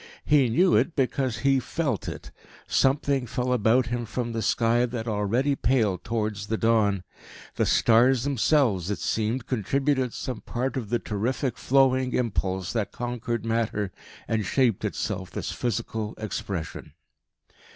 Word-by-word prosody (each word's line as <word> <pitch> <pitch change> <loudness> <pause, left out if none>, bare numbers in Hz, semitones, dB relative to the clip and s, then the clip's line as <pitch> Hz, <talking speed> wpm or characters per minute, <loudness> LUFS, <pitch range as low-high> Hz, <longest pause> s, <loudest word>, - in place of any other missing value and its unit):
He 145 -4 +4
knew 175 +11 +4
it, 165 - +2
because 130 -3 0
he 135 -1 +4
felt 135 - -2
it. - - -9 0.4
Something 135 -1 +2
fell 125 +2 -1
about 120 +2 +3
him 120 0 -3
from 120 +2 -3
the 115 0 -2
sky 115 +3 +2
that 120 -1 -5
already 115 +7 +1
paled 110 -8 +1
towards 110 -3 -2
the 110 - -1
dawn. 110 -5 +2 0.5
The - - 0
stars 120 +2 +4
themselves, 130 - +2
it 105 - -1
seemed, 115 +3 -1
contributed 130 +2 0
some 125 -4 -5
part 125 +1 -3
of 120 -6 -4
the 120 - +2
terrific, 120 +4 -2
flowing 130 -1 +2
impulse 95 -6 -1
that 110 -4 -1
conquered 120 -1 -3
matter 110 -4 -1 0.4
and 110 -1 0
shaped 120 0 +1
itself - - -3
this - - -4
physical 110 -1 -3
expression. 100 -5 -5
120 Hz, 140 wpm, -26 LUFS, 110-130 Hz, 0.5 s, He